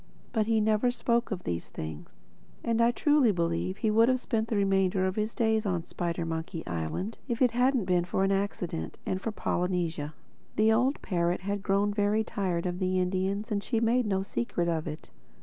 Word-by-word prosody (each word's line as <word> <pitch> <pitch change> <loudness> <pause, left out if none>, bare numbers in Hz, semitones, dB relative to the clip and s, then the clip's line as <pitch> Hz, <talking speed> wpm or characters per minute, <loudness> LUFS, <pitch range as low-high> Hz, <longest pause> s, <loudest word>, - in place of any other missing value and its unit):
But 220 -2 +1
he 225 -1 +3
never 215 +3 +3
spoke 235 -1 0
of 185 -4 -4
these 85 -1 -3
things. 80 -1 -7 0.5
And 230 0 +1
I 230 - +5
truly 290 -1 +4
believe 170 +1 -1
he 215 +1 +1
would 225 +3 +5
have 255 0 +2
spent 225 -2 -1
the 225 - -1
remainder 195 -1 +2
of 185 0 -1
his 215 +1 -2
days 220 -1 +2
on 180 -5 -1
Spidermonkey 165 -1 -3
Island 85 - -3
if 235 -3 -2
it 250 -3 +4
hadn't 250 -2 +2
been 180 -1 +2
for 190 +2 0
an 195 - +2
accident—and 185 - -2
for 225 - -2
Polynesia. 175 -6 -1 0.4
The 220 +1 +4
old 255 +5 +1
parrot 175 -2 0
had 200 +1 -2
grown 200 +2 +1
very 210 +1 +2
tired 190 -6 -2
of 180 0 -2
the 185 -1 +1
Indians 190 +4 -1
and 200 -1 +1
she 230 - 0
made 235 +1 +2
no 190 -1 +1
secret 195 -4 -2
of 160 -2 -1
it. 150 0 -7
195 Hz, 190 wpm, -29 LUFS, 175-225 Hz, 0.5 s, I